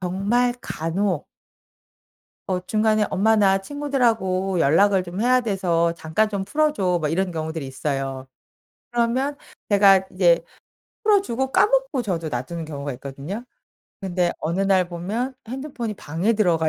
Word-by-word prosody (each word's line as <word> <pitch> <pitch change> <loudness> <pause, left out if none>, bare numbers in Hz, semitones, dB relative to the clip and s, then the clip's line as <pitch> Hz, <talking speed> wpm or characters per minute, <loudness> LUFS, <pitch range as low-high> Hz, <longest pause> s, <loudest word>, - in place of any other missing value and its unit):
정말 205 +7 +1
간혹 170 +2 -2 1.2
어 180 -1 0
중간에 215 0 +2
엄마나 200 -1 +3
친구들하고 220 - 0
연락을 190 +6 +4
좀 180 +3 -6
해야 255 +1 +4
돼서 175 -6 +1
"잠깐 170 +7 0
좀 200 -2 -3
풀어줘." 205 - +1
뭐 150 - 0
이런 180 +3 0
경우들이 160 -2 -4
있어요. 135 -1 -4 0.6
그러면 245 +4 0 0.3
제가 195 -2 +5
이제 175 -3 +3 0.6
풀어주고 265 - +2
까먹고 - - +2
저도 165 -6 -2
놔두는 155 +6 -4
경우가 140 -2 -5
있거든요. 140 - -7 0.6
근데 180 -2 0
어느 170 +5 -2
날 190 -2 +3
보면 210 +10 -3
핸드폰이 255 -4 -5
방에 180 +8 -1
들어가 170 -6 +2
195 Hz, 295 characters per minute, -23 LUFS, 170-230 Hz, 1.2 s, 제가